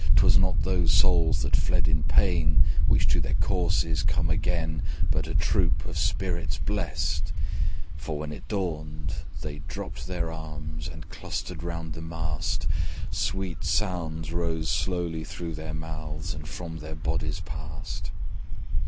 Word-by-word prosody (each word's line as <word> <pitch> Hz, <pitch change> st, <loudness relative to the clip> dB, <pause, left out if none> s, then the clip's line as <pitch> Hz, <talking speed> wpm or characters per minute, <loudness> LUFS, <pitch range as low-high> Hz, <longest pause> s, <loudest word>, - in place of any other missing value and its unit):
'Twas -, -, +6 dB
not 95 Hz, 0 st, +4 dB
those 90 Hz, -3 st, +3 dB
souls 85 Hz, -4 st, +5 dB
that -, -, +2 dB
fled 85 Hz, -2 st, +3 dB
in 80 Hz, -1 st, +3 dB
pain, 75 Hz, +3 st, +5 dB, 0.2 s
Which -, -, +5 dB
to -, -, +4 dB
their -, -, 0 dB
corses 85 Hz, -4 st, +2 dB
came 85 Hz, -1 st, +2 dB
again, 80 Hz, -3 st, +1 dB, 0.3 s
But -, -, +2 dB
a -, -, -3 dB
troop -, -, +3 dB
of -, -, -4 dB
spirits 85 Hz, -3 st, 0 dB
blest: -, -, -1 dB, 0.7 s
For 75 Hz, 0 st, -3 dB
when 75 Hz, 0 st, -4 dB
it 75 Hz, -, -8 dB
dawned 80 Hz, -6 st, -2 dB, 0.3 s
they 75 Hz, -1 st, -4 dB
dropped 75 Hz, -, -5 dB
their 85 Hz, -3 st, -1 dB
arms, 80 Hz, -1 st, -5 dB
And 80 Hz, +1 st, -8 dB
clustered 85 Hz, -3 st, -4 dB
round 85 Hz, -2 st, -3 dB
the 80 Hz, -, -6 dB
mast; 80 Hz, -1 st, -1 dB, 0.5 s
Sweet 95 Hz, -3 st, -1 dB
sounds 80 Hz, -2 st, 0 dB
rose 80 Hz, -2 st, 0 dB
slowly 85 Hz, -3 st, 0 dB
through 85 Hz, +2 st, -5 dB
their 80 Hz, 0 st, -4 dB
mouths, 80 Hz, +1 st, -4 dB
And 75 Hz, 0 st, -7 dB
from 85 Hz, -1 st, -5 dB
their 80 Hz, +1 st, -6 dB
bodies 80 Hz, -, -1 dB
passed. -, -, -5 dB
80 Hz, 145 wpm, -28 LUFS, 80-85 Hz, 0.7 s, Twas